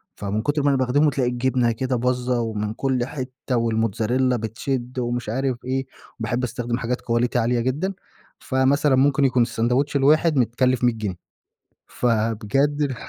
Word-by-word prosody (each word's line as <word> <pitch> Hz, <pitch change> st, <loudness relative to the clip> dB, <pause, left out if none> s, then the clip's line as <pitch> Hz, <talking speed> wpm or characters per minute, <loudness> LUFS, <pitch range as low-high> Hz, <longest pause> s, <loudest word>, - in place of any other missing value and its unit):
فمن 100 Hz, +2 st, -2 dB
كُتر 145 Hz, +4 st, 0 dB
ما 145 Hz, -, +3 dB
أنا 140 Hz, -, +2 dB
باخدمه 135 Hz, +4 st, +3 dB
تلاقي 130 Hz, -3 st, 0 dB
الجبنة 125 Hz, -1 st, +1 dB
كده 130 Hz, +3 st, -2 dB
باظّة 125 Hz, 0 st, 0 dB
ومن 105 Hz, -2 st, -3 dB
كل 130 Hz, 0 st, -1 dB
حتة 130 Hz, -1 st, -4 dB
والموتزاريلّا 115 Hz, +2 st, +1 dB
بتشِد 120 Hz, +3 st, -3 dB
ومش 120 Hz, -2 st, -2 dB
عارف 130 Hz, +2 st, -1 dB
إيه، 135 Hz, +1 st, -1 dB, 0.3 s
باحب 120 Hz, +2 st, -2 dB
أستخدم 120 Hz, 0 st, -2 dB
حاجات 125 Hz, 0 st, -2 dB
quality 120 Hz, +1 st, 0 dB
عالية 120 Hz, +1 st, +1 dB
جدًا، 145 Hz, +11 st, -1 dB, 0.5 s
فمثلّا 135 Hz, +1 st, +2 dB
ممكن 140 Hz, +1 st, +3 dB
يكون 130 Hz, -2 st, +2 dB
الساندويتش 125 Hz, +5 st, 0 dB
الواحد 150 Hz, +3 st, +3 dB
متكلف 125 Hz, +1 st, +1 dB
100 120 Hz, -1 st, +4 dB
جنيه. 105 Hz, -5 st, -4 dB, 0.7 s
فبجد 125 Hz, +5 st, 0 dB
125 Hz, 145 wpm, -23 LUFS, 115-135 Hz, 0.7 s, 100